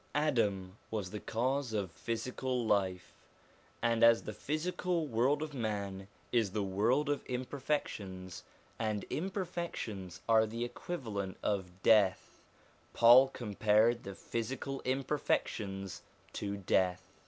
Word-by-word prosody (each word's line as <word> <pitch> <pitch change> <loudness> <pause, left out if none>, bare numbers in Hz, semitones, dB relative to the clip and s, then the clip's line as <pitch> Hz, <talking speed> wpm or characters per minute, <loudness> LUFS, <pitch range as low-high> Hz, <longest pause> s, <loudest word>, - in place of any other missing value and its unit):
Adam 105 -10 +1
was 105 -4 -3
the 105 - -4
cause 130 +3 -1
of 100 -5 -1
physical 125 +4 -2
life, 95 -4 0 0.7
and 115 0 +2
as 115 0 +7
the 110 - -5
physical 170 - -1
world 135 +4 +2
of 155 -1 -6
man 100 -5 -3 0.2
is 110 -6 +2
the 105 -2 0
world 110 +10 +2
of 145 -1 0
imperfections, 125 - -3 0.4
and 110 -2 -1
imperfections 170 - -4
are 110 -1 +5
the 115 +2 -3
equivalent 110 - -5
of 95 -3 -2
death, 105 -5 +3 0.5
Paul 120 +3 +8
compared 110 -1 +2
the 100 0 -7
physical 135 +6 -4
imperfections 110 - -1 0.3
to 100 -1 -3
death. 95 -1 +1
115 Hz, 115 wpm, -33 LUFS, 100-130 Hz, 0.7 s, Paul